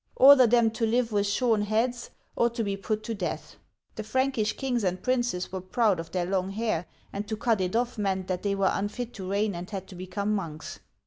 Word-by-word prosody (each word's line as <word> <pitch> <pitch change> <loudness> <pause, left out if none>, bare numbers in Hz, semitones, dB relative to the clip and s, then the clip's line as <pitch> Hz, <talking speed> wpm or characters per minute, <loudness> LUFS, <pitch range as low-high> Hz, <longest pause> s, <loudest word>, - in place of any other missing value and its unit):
Order 265 -2 +8
them 230 -1 +4
to 225 +1 -1
live 235 +1 +1
with 205 -1 +1
shorn 220 +1 +2
heads, 230 +4 0 0.3
or 235 - +3
to. 235 0 -3
be 200 -2 -1
put 215 +2 -3
to 230 - -3
death." 195 -5 -5 0.4
The 215 - -5
Prankish 235 -1 0
kings 250 -4 -1
and 185 -1 -1
princes 240 -8 0
were 190 -1 -4
proud 200 0 +1
of 165 0 -6
their 180 0 -1
long 190 0 -1
hair, 200 -4 -2 0.3
and 205 +1 -4
to 220 0 -3
cut 225 -3 +1
it 185 +3 -1
off 240 -1 0
meant 190 -2 0
that 185 -1 -2
they 200 -1 0
were 195 -1 +2
unfit 225 +4 -3
to 190 -2 -6
reign 200 +1 +1
and 175 +1 -6
had 195 -3 -5
to 185 - -10
become 200 +3 -2
monks. 160 -7 -5
210 Hz, 220 wpm, -27 LUFS, 190-235 Hz, 0.4 s, Order